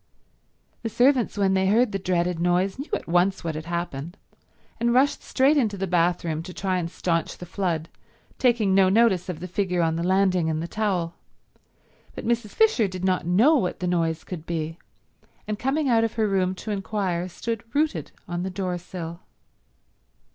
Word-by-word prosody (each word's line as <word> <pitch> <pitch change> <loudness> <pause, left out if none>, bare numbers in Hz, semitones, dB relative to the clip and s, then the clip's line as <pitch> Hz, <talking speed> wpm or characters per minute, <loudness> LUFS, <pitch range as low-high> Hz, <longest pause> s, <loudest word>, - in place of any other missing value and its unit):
The 230 - -3
servants 245 0 +2
when 195 -1 +2
they 190 0 +2
heard 225 +3 +3
the 195 - -2
dreaded 180 -2 0
noise 180 +5 +1
knew 280 - -6
at - - -2
once 180 +3 +2
what 165 -1 -2
had 155 +1 -6
happened, 170 -1 -4 0.6
and 235 +1 +2
rushed 275 +3 +3
straight 280 +3 +3
into 215 -7 +1
the 195 - -1
bathroom 170 -2 +1
to 180 +2 -9
try 185 -2 0
and 170 -1 -3
staunch 165 -1 -1
the 180 - -8
flood, 175 -3 -2 0.5
taking 235 -6 +3
no 190 -1 +5
notice 195 -4 +3
of 170 -4 -4
the 180 - -6
figure 180 -1 0
on 165 0 +1
the 170 - -2
landing 185 -2 +2
in 155 -1 -1
the 165 - -3
towel, 185 -5 -1 1.0
but - - -6
Mrs. 235 -2 0
Fisher 435 - +4
did 185 -1 -5
not 185 -3 +1
know 225 - +5
what 185 -9 -1
the 180 - -2
noise 165 -2 0
could 170 -3 -8
be, 165 -1 -3 0.7
and 210 -1 -3
coming 275 +4 0
out 230 -3 +4
of 225 - -1
her 220 -2 +1
room 190 -2 +1
to 215 - -6
inquire 195 -3 -2
stood 230 +5 -4
rooted 285 - 0 0.2
on 175 0 -3
the 190 - -2
door 180 -1 -3
sill. 170 -1 -7
185 Hz, 185 wpm, -25 LUFS, 175-215 Hz, 1.0 s, no